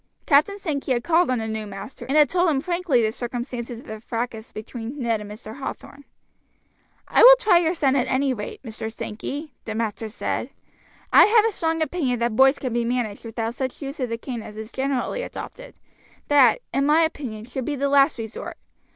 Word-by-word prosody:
Captain 310 +8 +4
Sankey 290 -8 -2
had 240 -1 -1
called 345 -1 +3
on 255 - +1
the 220 -1 -3
new 220 -1 -4
master, 195 +6 -9
and 275 +3 +1
had 300 -1 +7
told 355 +4 +2
him 285 -4 +1
frankly 340 -6 +1
the 215 - +1
circumstances 240 0 -5
of 245 - -12
the 215 0 -8
fracas 230 -1 -4
between 230 +4 -7
Ned 230 -5 0
and 205 - -8
Mr. 215 +2 -9
Hathorn. 280 +1 -7 1.0
"I - - +3
will - - +11
try 425 -8 +4
your 340 +1 +1
son 275 -5 +2
at 260 -1 +1
any 265 0 +1
rate, 210 +1 -7
Mr. 220 -2 -6
Sankey," 255 +6 -6
the 220 - -4
master 220 0 -3
said. 215 - -3 0.6
"I - - +9
have 440 0 +5
a 450 - +2
strong 325 -4 0
opinion 295 -7 -1
that 235 -1 -1
boys 270 +3 +5
can 255 -4 -4
be 240 0 +1
managed 235 -3 -2
without 225 0 -3
such 260 0 -4
use 275 +2 -6
of 250 -2 -1
the 230 - -2
cane 235 0 -6
as 215 0 -10
is 220 +1 -7
generally 270 - -1
adopted; - - -8 0.5
that, 270 -6 +5
in 275 +2 +2
my 310 +2 +5
opinion, 260 -9 -3
should 255 +1 -5
be 295 - -2
the 280 +1 0
last 280 0 +4
resort. 225 -1 -7
255 Hz, 205 wpm, -23 LUFS, 225-295 Hz, 1.0 s, will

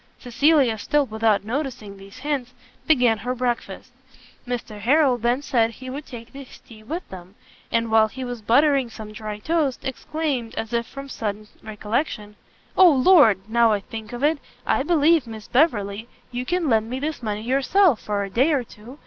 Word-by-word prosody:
Cecilia, 260 -2 +2
still 295 +6 +1
without 220 -3 +1
noticing 235 -4 -4
these 195 +1 -14
hints, 260 -3 -3 0.3
began 245 -8 +3
her 250 +4 -3
breakfast. 240 -2 -3 0.6
Mr 235 -4 -5
Harrel 260 +2 +3
then 240 +4 0
said 230 -5 +2
he 255 +3 -9
would 285 +3 -7
take 235 -2 -10
his 275 -1 -12
tea 220 -2 -16
with 320 +11 -6
them: 185 +1 -11 0.4
and, 230 -1 0
while 220 0 +5
he 260 +4 -8
was 245 -2 -6
buttering 270 +3 +3
some 220 -1 -9
dry 215 0 -6
toast, 295 +2 -1
exclaimed, 265 -3 -3
as 225 +1 -5
if 235 -1 0
from 275 0 -9
sudden 215 -4 -5
recollection, 210 0 -3 0.4
"O 370 -1 +8
Lord, 260 - +5
now 230 0 +3
I 205 - 0
think 220 +2 -9
of 240 +2 -6
it, 300 0 +2 0.3
I - - +1
believe, 315 -2 +3
Miss 220 -2 -9
Beverley, 225 -7 +1 0.2
you 250 +1 -4
can 355 -2 0
lend 225 -3 +2
me 255 +2 -3
this 300 0 -4
money 215 -2 -3
yourself 275 - +2
for 205 -1 -2
a 195 - -5
day 265 +9 +3
or 270 -4 +1
two. 235 +4 -14
240 Hz, 180 wpm, -23 LUFS, 220-280 Hz, 0.6 s, O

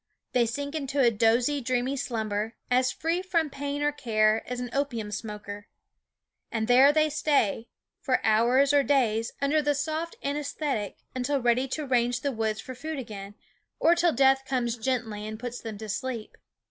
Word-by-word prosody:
They 240 -2 +3
sink 285 +5 -4
into 285 -2 -2
a 240 -3 +5
dozy, 235 +6 +2
dreamy 255 +2 0
slumber, 220 -4 -2 0.2
as 250 0 +3
free 335 +3 -1
from 335 -5 0
pain 285 +1 -3
or 295 - +2
care 220 -5 +2
as 250 - -2
an 245 -1 -5
opium 240 -7 -2
smoker. 205 -1 -6 0.8
And 220 -1 -1
there 260 +3 +7
they 310 +1 +3
stay, 285 -7 +1 0.3
for 260 -2 +1
hours 245 +6 +4
or 285 - +6
days, 235 -5 +1
under 300 +2 +3
the 290 0 +1
soft 315 +3 -2
anaesthetic 285 -6 -2 0.2
until 265 +2 0
ready 245 +2 +2
to 300 +3 -3
range 245 -2 +1
the 280 - 0
woods 220 -3 -1
for 255 - -7
food 310 +5 -5
again, 205 -5 -7 0.4
or 335 - +5
till 345 0 +3
death 270 -1 +4
comes 250 -3 -1
gently 225 -3 -2
and 215 0 -6
puts 245 0 -5
them 220 -3 -6
to 220 +1 -7
sleep. 235 +1 -4
255 Hz, 170 wpm, -27 LUFS, 225-285 Hz, 0.8 s, there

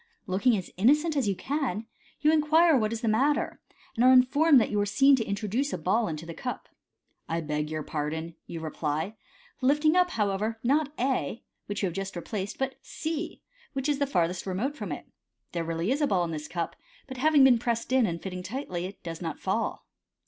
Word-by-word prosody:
Looking 210 +4 +2
as 185 - -6
innocent 300 - +3
as 270 -6 +1
you 200 - +1
can, 255 -5 -2 0.4
you 300 - +5
inquire 320 +2 +5
ivhat 220 -6 +2
is 230 0 -3
the 235 - -1
matter, 270 +7 +1 0.3
and 230 - +1
are 255 - +7
informed 275 +3 +6
that 225 - 0
you 210 - +1
were 205 - +2
seen 275 +7 +5
to 230 - 0
introduce 215 +7 -1
t - - -3
ball 210 +8 +1
into 160 -1 -5
the 165 - -7
cup. - - -5 0.3
" - - -37
I 165 - 0
beg 150 -1 -2
your 155 -1 -3
pardon," 160 +3 -3
you 165 -1 -6
reply, 155 +4 -2 0.5
lifting 295 +5 +3
up, 360 0 +4
however, 210 - -1
not 285 +4 +2
A, 255 -2 -1 0.2
which 205 0 -3
you - - +4
have 175 - -2
just 195 +1 -4
replaced, 195 +3 -4
but 265 0 -3
C, 320 +1 -5 0.3
which 270 0 -2
is 290 -1 +1
the 280 - +1
farthest 180 -6 0
remote 220 +10 -1
from - - -5
it. - - -5 0.5
There 170 - -2
is 165 - -5
really 165 +6 -1
a 290 +2 +2
ball 185 -6 +2
in 170 - -3
this 150 -1 -5
cup, 170 0 -3 0.3
but 260 -2 -8
having 295 +1 +5
been 255 -3 +6
pressed 235 0 -2
in, 260 -4 +4
and 170 -2 -3
fitting 180 -1 -5
tightly, 185 -4 -4
it 195 - -13
does 165 -1 -6
not 165 -3 -4
fall. - - -2
220 Hz, 215 wpm, -28 LUFS, 175-275 Hz, 0.5 s, are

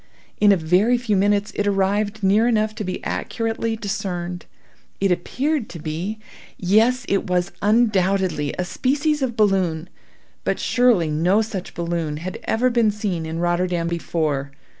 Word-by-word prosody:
In 205 -1 +6
a 195 - +4
very 180 +9 +3
few 235 -4 0
minutes 205 +2 +2
it 205 - -1
arrived 205 +2 0
near 210 +4 +4
enough 215 -2 +1
to 215 - -5
be 185 -1 -4
accurately 225 0 -2
discerned. 190 -4 -4 0.5
It 195 -1 +2
appeared 260 - -1
to 170 - -8
be—yes! 210 +7 -1
it 195 - 0
was 180 0 0
undoubtedly 195 -7 +2
a 180 - -1
species 290 - 0
of 245 -4 -2
balloon; 185 -5 +1 0.5
but - - -1
surely 235 -11 +3
no 180 +8 +2
such 205 -4 -6
balloon 170 -3 -2
had 180 +4 -6
ever 250 +3 +2
been 235 -2 +3
seen 200 -6 -3
in 160 +1 -4
Rotterdam 175 0 0
before. 155 -4 -1
195 Hz, 145 wpm, -22 LUFS, 175-220 Hz, 0.5 s, In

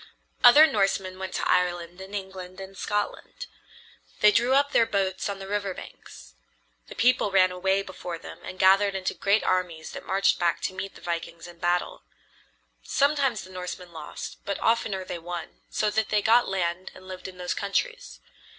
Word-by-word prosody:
Other 290 +6 +10
Norsemen 195 -6 0
went 190 0 -5
to - - -1
Ireland 175 0 0
and 195 +2 -8
England 190 -1 -7
and 195 0 -9
Scotland. 210 - -3 0.8
They 210 - +7
drew 240 +5 +3
up 285 +1 +3
their 230 - +4
boats 195 -1 -1
on 200 - -3
the 195 - -8
river 200 -2 -2
banks. - - -12 0.5
The - - -10
people 245 -3 +3
ran 185 -1 +4
away 190 +2 +1
before 180 -2 -7
them - - -11
and 185 - -8
gathered 195 +1 +4
into 190 -1 -2
great 200 +2 +2
armies 175 -4 -1
that - - -8
marched 195 +1 +2
back 175 -1 +1
to - - -2
meet 190 +1 -6
the - - -13
vikings 170 0 -5
in 175 -1 -14
battle. 175 - 0 0.8
Sometimes 275 - +1
the 185 - -13
Norsemen 180 -1 -7
lost, 155 -2 -8
but 200 - -2
oftener 205 -4 +1
they 175 -1 -5
won, 175 +1 -7
so 210 -1 0
that 220 0 0
they 210 -1 +2
got 235 +1 +4
land 185 -1 -2
and 185 - -13
lived 185 0 -7
in 185 -1 -11
those 180 0 -2
countries. - - -3
190 Hz, 180 wpm, -26 LUFS, 180-205 Hz, 0.8 s, Other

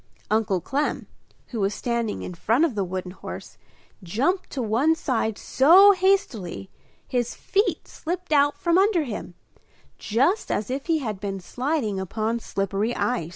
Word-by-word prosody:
Uncle 215 -4 +2
Clem, 275 - -2 0.4
who 235 - -4
was 195 0 0
standing 235 -3 -2
in 180 - -6
front 225 - +2
of 310 - -2
the 205 -2 -1
wooden 185 0 -4
horse, - - -9 0.4
jumped 265 - -1
to 275 - -5
one 250 +8 +2
side 225 -8 -1
so 360 +9 +6
hastily 365 - 0 0.4
his 245 -2 -1
feet 405 +2 0
slipped 355 +1 -5
out 290 0 +4
from 340 +4 +2
under 390 -4 +3
him, 210 -8 -6 0.6
just 275 - +1
as 215 +4 -1
if 270 +4 -4
he 330 -2 +3
had 220 -9 -4
been 195 -1 -4
sliding 245 - -2
upon 220 +5 -2
slippery 200 +2 -2
ice. 240 -10 -1
240 Hz, 155 wpm, -24 LUFS, 205-315 Hz, 0.6 s, so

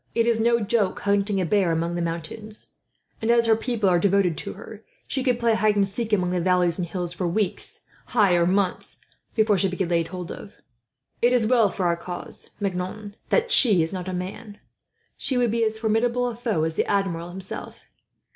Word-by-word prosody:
It 230 -1 +3
is 235 -1 +2
no 235 +1 +3
joke 210 -2 0
hunting 200 0 +1
a 185 - 0
bear 190 -1 +2
among 165 +1 -1
the 175 - -2
mountains; 170 +6 -5 0.5
and 220 - -1
as 235 0 +4
her 225 -1 +4
people 225 -2 -1
are 175 -2 +4
devoted 195 -2 +2
to - - -5
her, - - -11 0.2
she 270 - -2
could 250 -2 +1
play 235 -1 +2
hide 215 -1 +2
and 200 -1 +3
seek 225 +3 -4
among 180 -4 +1
the 180 -1 0
valleys 180 -1 +2
and 175 - -2
hills 175 -1 -4
for 180 0 -2
weeks 195 +3 -2 0.3
ay, 205 -5 +5
or 170 -1 +3
months 190 0 0 0.4
before 215 -3 +3
she 195 - +3
could 180 - -5
be 190 - 0
laid 170 -1 0
hold 180 0 -7
of. 205 - -10 0.7
"It 240 - +4
is 240 -3 +3
well 230 -3 +4
for 185 -1 -3
our 170 -1 +2
cause, 175 +1 -3
Maignan, 200 +1 -4 0.2
that 480 -1 +1
she 205 - +6
is 160 - -3
not 185 -1 -5
a - - -3
man. 195 +4 -6 0.6
She 260 - -2
would 240 -3 +2
be 230 0 +1
as 220 0 0
formidable 235 +3 +1
a 240 - -4
foe 225 -8 -1
as 160 0 -1
the - - 0
Admiral 180 -4 -1
himself. 190 +1 -7
200 Hz, 210 wpm, -24 LUFS, 180-225 Hz, 0.7 s, she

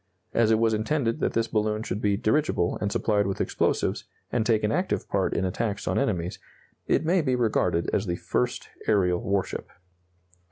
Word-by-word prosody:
As 115 -2 +3
it 110 - +4
was 115 0 +2
intended 115 +2 0
that - - 0
this 115 0 +1
balloon 110 0 0
should 105 -1 -3
be 100 -1 +2
dirigible 110 - +1
and 105 - 0
supplied 105 -1 +1
with 95 - -3
explosives, - - 0 0.3
and 115 - +1
take 110 -1 +2
an 105 - +1
active 180 +7 -1
part 95 -1 0
in 95 - +1
attacks 100 +2 -2
on - - +1
enemies, 90 -10 -1 0.5
it - - +2
may 175 +2 +3
be 130 -4 +1
regarded 105 -8 +1
as 100 - 0
the 85 - 0
first 60 - -2 0.2
aerial 90 -4 +2
warship. 100 -4 -2
110 Hz, 185 wpm, -26 LUFS, 100-115 Hz, 0.5 s, it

